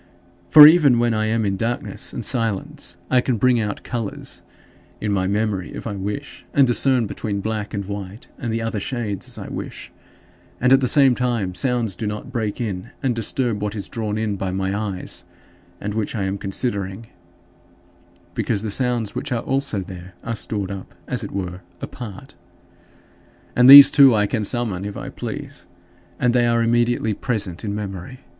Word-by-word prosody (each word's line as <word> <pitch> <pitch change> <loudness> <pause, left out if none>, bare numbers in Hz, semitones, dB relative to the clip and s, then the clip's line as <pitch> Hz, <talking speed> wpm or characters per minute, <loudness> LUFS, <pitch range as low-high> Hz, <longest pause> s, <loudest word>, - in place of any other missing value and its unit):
For 150 +9 +11
even 150 -6 +6
when 120 0 +2
I 110 0 0
am 110 0 0
in 100 -1 -1
darkness 120 +7 -3
and 120 - -3
silence 105 -7 -1
I 130 -1 +5
can 125 -2 -1
bring 125 +2 +3
out 105 -2 -3
colors 115 -4 -5 0.6
in 105 - -2
my 95 -2 0
memory 100 -2 -1
if - - -8
I 110 -3 -4
wish, 105 +9 -6
and 140 - +6
discern 125 0 +2
between 100 -1 -4
black 105 0 -3
and 100 -2 -4
white 100 +1 -7
and 115 - -3
the 115 0 -2
other 115 -2 -2
shades 105 -3 -3
as - - -4
I - - -7
wish; - - -7 0.7
and 125 +2 +4
at 135 - +5
the 130 - +1
same 135 -1 +6
time, 120 -7 -1
sounds 120 -3 0
do 110 +3 -4
not 105 +4 -5
break 110 -5 -3
in 105 -2 -4
and 130 -2 +1
disturb 115 -1 -1
what 105 0 -3
is 100 - -4
drawn 110 -2 -3
in 110 -2 -2
by 95 0 -3
my 95 +1 -2
eyes, 100 -3 -4 0.6
and 105 +1 -4
which 110 +1 -2
I 105 - -1
am 95 +1 -2
considering, 100 0 -3 1.3
because 110 0 -1
the 110 - -3
sounds 120 -3 0
which 145 - -5
are 120 -2 -1
also 135 -6 -1
there 90 0 -10
are 115 0 -3
stored 100 -2 -3
up, 95 -1 -8
as - - -3
it - - -5
were, 90 -2 -5 0.2
apart. 120 +3 -9 1.2
And 125 +1 +6
these 140 0 +12
too 135 -4 +7
I 105 -1 +3
can 105 0 -2
summon 110 -5 -2
if 100 0 -5
I - - -6
please 140 -1 -7 0.5
and 125 -1 +2
they 120 -1 +3
are 115 0 +2
immediately 120 -1 +1
present 105 -6 -3
in 100 -2 -3
memory. 100 +4 -6
110 Hz, 185 wpm, -21 LUFS, 100-120 Hz, 1.3 s, these